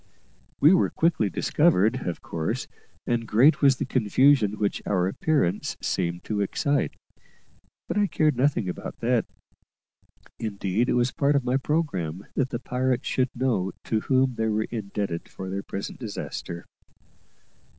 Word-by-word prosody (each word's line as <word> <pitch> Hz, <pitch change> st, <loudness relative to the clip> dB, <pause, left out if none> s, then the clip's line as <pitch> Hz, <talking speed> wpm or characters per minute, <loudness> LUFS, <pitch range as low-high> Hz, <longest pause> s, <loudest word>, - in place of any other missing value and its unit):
We 155 Hz, +5 st, +7 dB
were 185 Hz, -, +3 dB
quickly 160 Hz, -, +1 dB
discovered, 95 Hz, +3 st, +2 dB
of 85 Hz, -, -4 dB
course, 80 Hz, -1 st, -3 dB, 0.4 s
and 120 Hz, -1 st, -1 dB
great 130 Hz, +9 st, +5 dB
was 140 Hz, -2 st, +6 dB
the -, -, -3 dB
confusion 125 Hz, -1 st, +3 dB
which 100 Hz, -1 st, -1 dB
our 90 Hz, -3 st, +1 dB
appearance 120 Hz, -, 0 dB
seemed 85 Hz, -1 st, -2 dB
to 105 Hz, -2 st, -2 dB
excite; 140 Hz, +8 st, 0 dB, 0.9 s
but -, -, 0 dB
I 205 Hz, -, +3 dB
cared 155 Hz, -5 st, +2 dB
nothing 130 Hz, -5 st, +1 dB
about 90 Hz, -, -5 dB
that 120 Hz, -1 st, +1 dB, 1.1 s
indeed, 105 Hz, +1 st, -1 dB
it -, -, +2 dB
was 125 Hz, +1 st, +2 dB
a -, -, -30 dB
part 145 Hz, 0 st, +2 dB
of 140 Hz, -3 st, +1 dB
my 125 Hz, +1 st, +2 dB
programme 100 Hz, -, -2 dB
that 130 Hz, -1 st, 0 dB
the 120 Hz, -, -2 dB
pirates 125 Hz, +1 st, -1 dB
should 130 Hz, 0 st, +1 dB
know 115 Hz, -8 st, 0 dB
to 110 Hz, -, 0 dB
whom 130 Hz, +1 st, +2 dB
they 110 Hz, -1 st, -1 dB
were 110 Hz, 0 st, +1 dB
indebted 100 Hz, -6 st, -4 dB
for 95 Hz, 0 st, -7 dB
their 100 Hz, +1 st, -2 dB
present 100 Hz, 0 st, -6 dB
disaster. 100 Hz, -6 st, -6 dB
115 Hz, 150 wpm, -26 LUFS, 100-135 Hz, 1.1 s, We